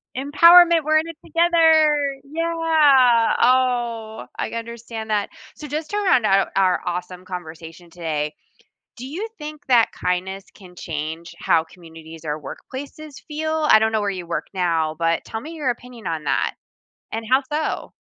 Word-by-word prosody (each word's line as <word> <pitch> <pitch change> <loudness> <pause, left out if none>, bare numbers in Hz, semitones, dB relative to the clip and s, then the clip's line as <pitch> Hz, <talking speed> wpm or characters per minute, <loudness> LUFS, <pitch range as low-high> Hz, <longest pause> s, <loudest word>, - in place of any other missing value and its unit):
"Empowerment! 335 +5 +6
We're 310 0 +3
in 325 - -4
it 330 - -9
together! 315 -4 +3
Yeah!" 300 -6 +3
Oh, 240 -3 +1
I - - -2
understand 230 -1 -7
that. 210 -2 0 0.3
So, 300 - -9
just 305 +2 -4
to 410 - -1
round 365 - +3
out 195 -1 +3
our 190 -1 +2
awesome 180 +1 -5
conversation 170 -1 -9
today, 155 -3 -3 0.6
do 250 - -9
you 360 +11 -5
think 300 0 -8
that 240 -3 +4
kindness 190 +2 -3
can 180 -2 -16
change 160 +1 -6
how 160 -1 +2
communities 165 -2 -13
or 150 0 -3
workplaces 275 - -9
feel? 315 0 -2
I - - +8
don't 220 0 +1
know 220 -1 0
where 205 - -1
you 180 -3 -7
work 170 - -3
now, 165 -4 0
but 165 0 0
tell 220 - -6
me 310 - -9
your 300 -5 -2
opinion 240 -2 -11
on 160 -2 -3
that, - - 0 0.6
and 225 +1 -4
how 260 +2 +4
so? 305 +1 -3
230 Hz, 160 wpm, -21 LUFS, -, 0.6 s, I